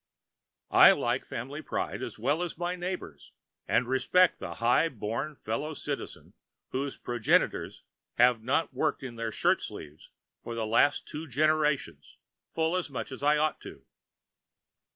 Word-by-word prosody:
I - - +9
like - - -1
family 135 +6 -6
pride - - -3
as - - -6
well 155 +4 0
as 175 -3 -4
my 175 +1 -2
neighbors, 180 +1 -6 0.4
and 125 - +2
respect 130 +8 +3
the - - -6
high 125 +8 +3
born 120 +5 -4
fellow 145 +7 -4
citizen 145 -1 -6 0.4
whose 135 +1 -3
progenitors 120 -2 0 0.3
have 120 -2 +4
not 130 +6 0
worked 130 - -1
in 125 -3 -6
their 115 -1 -3
shirt - - +2
sleeves 75 0 -9 0.3
for 120 - -5
the 115 -1 -2
last 115 +6 +3
two 155 +2 -6
generations 150 +1 0 0.4
full 160 +2 +1
as 185 -4 -2
much 135 - -5
as 130 - -8
I 150 +1 +4
ought 155 +1 0
to. - - -11
140 Hz, 150 wpm, -29 LUFS, 120-155 Hz, 0.4 s, I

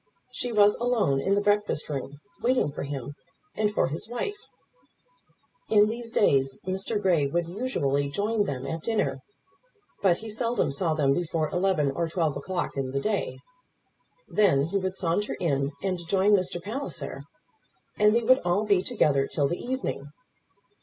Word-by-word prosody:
She 250 -1 -3
was 210 -2 +5
alone 230 - +1
in 195 +5 +2
the 205 - +2
breakfast 205 -6 +1
room, 140 -1 -5 0.2
waiting 245 - +2
for - - -6
him 140 -1 -5 0.4
and 210 -1 +1
for - - +2
his 160 +9 -5
wife. 405 +13 -4 1.2
In 210 -1 +5
these 230 0 -5
days, 135 -10 +2
Mr. 190 +3 -1
Grey 175 -8 +2
would 170 +4 0
usually 145 - -1
join 205 +6 0
them 135 -6 -4
at 160 0 -4
dinner; 150 -11 -1 0.8
but 180 -3 +4
he 225 - -8
seldom 230 - 0
saw 160 +3 0
them 140 -3 +3
before 160 -1 -1
eleven 180 -6 +1
or 165 +5 -1
twelve 160 -4 0
o'clock 175 +6 -3
in 135 -2 -2
the 140 - +1
day. 210 +7 -1 0.9
Then 185 -10 +3
he 170 +7 -1
would 185 0 -3
saunter 190 +3 -1
in 140 -4 0
and 185 -2 -1
join 195 +3 +3
Mr. 185 -3 +2
Palliser, 225 +11 -5 0.8
and 210 +1 +5
they 235 - +2
would 255 +3 +5
all 175 +4 +1
be 200 -3 +3
together 150 - +2
till 145 -3 0
the 175 - -4
evening. 250 - -3
185 Hz, 160 wpm, -27 LUFS, 145-210 Hz, 1.2 s, was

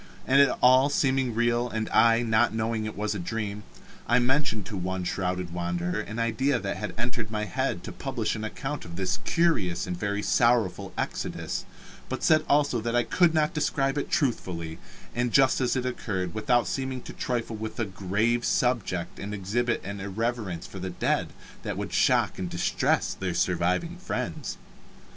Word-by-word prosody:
And 135 +2 +6
it 140 - +6
all 130 +2 +7
seeming 130 -4 +1
real, 120 +1 +2
and 110 -1 -2
I 115 +1 +5
not 110 0 +3
knowing 110 0 -1
it 110 - -5
was 105 +1 -1
a 105 - -4
dream, 105 +2 -3 0.5
I 120 - +4
mentioned 125 -5 +1
to 105 - -6
one 95 0 -2
shrouded 90 -1 -2
wanderer 90 +2 -1
an 105 +1 -7
idea 125 +4 +1
that 100 -4 -3
had 105 -3 -5
entered 120 -2 -2
my 105 -1 -2
head 130 -7 -2
to - - -6
publish 130 -6 -2
an 110 - -5
account 135 +6 -4
of 85 0 -9
this 95 0 -1
curious 100 - +2
and 90 - -3
very 100 +2 -2
sorrowful 115 -5 +2
exodus, - - -3 0.4
but - - -4
said 155 -1 +5
also 145 -5 +3
that 115 +1 -1
I 120 - +4
could 170 +2 +3
not 155 -1 +2
describe 135 -3 0
it 145 - -2
truthfully, 85 - -1 0.3
and 120 0 0
just 135 +1 +4
as 125 0 +1
it 130 -1 -1
occurred, 95 -8 -2
without 120 +2 +2
seeming 130 -2 -3
to - - -8
trifle 120 -2 -2
with 110 +2 -6
a 115 - +1
grave 100 +5 0
subject 115 -11 0
and 105 +1 -4
exhibit 115 +5 -1
an 100 +1 -5
irreverence 100 -3 -2
for - - -8
the - - -3
dead - - 0 0.3
that - - -4
would - - -4
shock - - +3
and 90 -1 -2
distress - - +1
their - - -3
surviving 165 - +1
friends. 185 - -4
115 Hz, 180 wpm, -27 LUFS, 100-125 Hz, 0.5 s, all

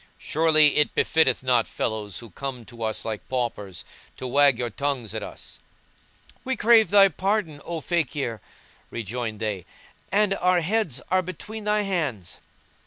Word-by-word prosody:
surely 155 -2 +3
it 150 - +2
befitteth 145 -6 +2
not 125 -3 +2
fellows 105 -3 -3
who 115 -3 -9
come 130 +2 -6
to 115 +1 -13
us 110 -1 -2
like 110 -2 -5
paupers 115 -7 -3 0.3
to - - -6
wag 140 0 +4
your 120 -1 -2
tongues 135 -3 -2
at - - -4
us." - - -10 0.8
"We 260 0 -1
crave 225 0 +5
thy 200 -1 +7
pardon, 185 -4 -1
O 170 -2 -4
Fakír,"[FN#170] 145 -9 -1 0.5
rejoined 115 0 -4
they, 105 -5 -3 0.5
"and 205 -1 +3
our 180 -1 +3
heads 180 - 0
are 185 0 +4
between 205 +5 -7
thy 210 0 +2
hands." 145 - -3
145 Hz, 150 wpm, -25 LUFS, 115-185 Hz, 0.8 s, thy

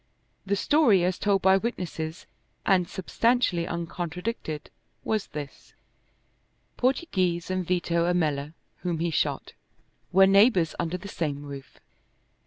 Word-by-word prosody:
The 200 - +2
story 225 - +4
as 180 +1 0
told 200 -2 +1
by 190 0 +6
witnesses 180 -6 -4 0.4
and 185 -3 +3
substantially 195 -2 +1
uncontradicted 170 0 -4 0.3
was 215 -2 -1
this: 145 -2 -9 1.0
Portoghese 185 - 0
and 185 0 0
Vito 175 -1 +1
Ammella, 150 -3 -1 0.2
whom 175 -2 -2
he 170 +1 -1
shot, - - -1 0.6
were 190 +1 +7
neighbors 195 -4 +4
under 170 +1 -1
the 200 - -10
same 145 -6 -3
roof. 140 -2 -9
180 Hz, 115 wpm, -26 LUFS, 165-195 Hz, 1.0 s, were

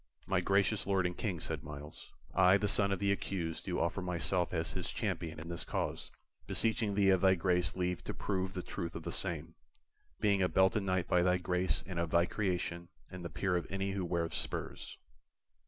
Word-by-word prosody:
"My 95 -1 +1
gracious 100 +2 +2
Lord 95 -2 +2
and 90 0 -1
King," 95 -7 -2
said - - -4
Myles, 75 +1 -9 0.2
"I, 95 +1 +6
the 105 - 0
son 100 0 +3
of 95 - +1
the 100 0 +1
accused, 90 -4 -2
do - - -1
offer 85 +3 0
myself 90 0 0
as 80 -2 -1
his - - -2
champion 80 -1 -3
in 80 - -8
this 85 -1 -3
cause, - - -3 0.4
beseeching 110 -2 +1
thee 100 -1 +5
of 95 -2 +3
thy 95 -1 +6
grace 90 0 +1
leave 90 -1 -1
to - - -3
prove 95 -1 -2
the 90 - -3
truth 85 - -5
of - - -5
the - - -4
same, 85 -3 -3 0.7
being 100 -2 +3
a 90 - +3
belted 95 +3 +4
knight 95 -2 0
by 90 - +4
thy 90 +1 +3
grace 90 +1 0
and 90 -3 -4
of 85 -1 0
thy 85 +2 +4
creation 90 -3 -2 0.2
and 90 -1 -7
the 85 - -4
peer 95 0 0
of 85 - -1
any 95 0 -1
who 95 -1 -2
weareth 85 -1 -1
spurs." - - -3
90 Hz, 205 wpm, -33 LUFS, 85-95 Hz, 0.7 s, I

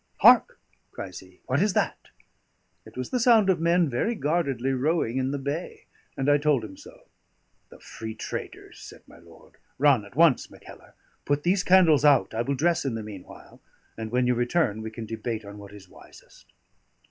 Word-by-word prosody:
Hark!" - - +6 0.3
cries 95 -2 -8
he. 95 -1 -19
"What 130 +4 0
is 205 -1 +1
that?" - - -2 0.8
It - - -15
was 130 - -5
the 250 - 0
sound 225 -5 +4
of 175 - -1
men 170 +1 +2
very 140 - -1
guardedly 140 - -1
rowing 135 -2 0
in 130 0 -1
the 140 - -2
bay; 140 +5 -5 0.3
and 135 - -2
I 145 0 +4
told 145 -5 +1
him 95 -2 -11
so. - - -16 0.6
"The - - -16
free 110 -1 -8
traders," - - -8
said - - -13
my - - -17
lord. 85 -1 -19 0.2
"Run 135 -5 +3
at 100 - -15
once, 160 -3 +3
Mackellar; - - -16 0.3
put 145 0 -1
these 185 +2 +2
candles 175 -6 +4
out. 145 -6 +4
I 110 - -1
will 140 +4 -2
dress 165 +5 +1
in 135 -5 -2
the 110 - -5
meanwhile; 100 -4 -12 0.3
and 110 -1 -6
when 125 +1 +1
you 125 - +2
return 120 -2 0
we 110 - -5
can 110 +1 -8
debate 110 0 -5
on 100 +1 -10
what 100 -1 -12
is 100 -2 -14
wisest." - - -18
135 Hz, 190 wpm, -25 LUFS, 110-160 Hz, 0.8 s, Hark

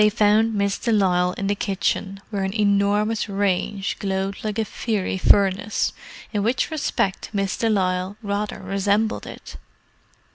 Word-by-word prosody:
They 210 - +6
found 215 +1 +3
Miss 200 -1 0
de 235 - 0
Lisle 180 -4 +3
in 200 - -4
the 200 - +2
kitchen, 195 -1 -2
where 200 -2 -1
an 190 +3 -2
enormous 205 +2 +2
range 195 0 -1
glowed 195 0 -2
like 215 -1 -2
a 220 - +1
fiery 205 -3 -2
furnace, 200 +2 +3 0.4
in 205 - +1
which 240 +8 0
respect 205 -10 -1
Miss 195 -2 0
de 225 - 0
Lisle 185 -1 0
rather 205 0 -2
resembled 200 +3 0
it. - - -10
200 Hz, 150 wpm, -23 LUFS, 195-210 Hz, 0.4 s, They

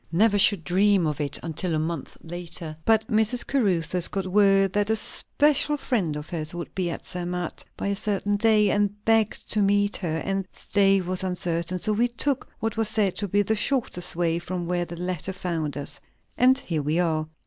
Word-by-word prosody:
Never 205 +4 +3
should 195 -3 +3
dream 195 +1 +3
of 150 -1 -2
it, 145 - 0
until 165 +1 -2
a - - +1
month 160 -1 -4
later. 170 -1 -7
But 220 -1 +3
Mrs. 220 +3 +2
Caruthers 180 -9 +1
got 195 -1 -3
word 195 0 +3
that 205 0 +1
a 220 - +3
special 295 +6 +2
friend 195 - -1
of 150 +1 -6
hers 160 -1 -4
would 175 - -7
be 185 -2 -1
at 170 - -6
Zermatt 180 -1 -4
by - - -4
a 200 - 0
certain 205 0 -1
day, 210 -1 +3
and 205 0 -1
begged 225 -1 +1
to 210 - +2
meet 205 +1 +2
her; 165 -4 -3
and 195 -1 -2
stay 195 -1 +2
was 185 +1 -2
uncertain; 175 -1 -2
and 180 - -4
so 215 - +2
we 235 +3 +2
took 255 +3 -1
what 225 0 -3
was 225 -1 +2
said 210 -4 +1
to 205 - -2
be 205 +2 +2
the 220 - 0
shortest 220 -7 +1
way 170 -1 0
from 175 0 -4
where 175 0 -1
the 170 - -8
letter 180 +1 -3
found 165 -6 -3
us. 145 0 -4 0.4
And 255 +1 +4
here 160 - -3
we 150 +3 -1
are." 160 -3 0
190 Hz, 205 wpm, -25 LUFS, 170-210 Hz, 0.4 s, And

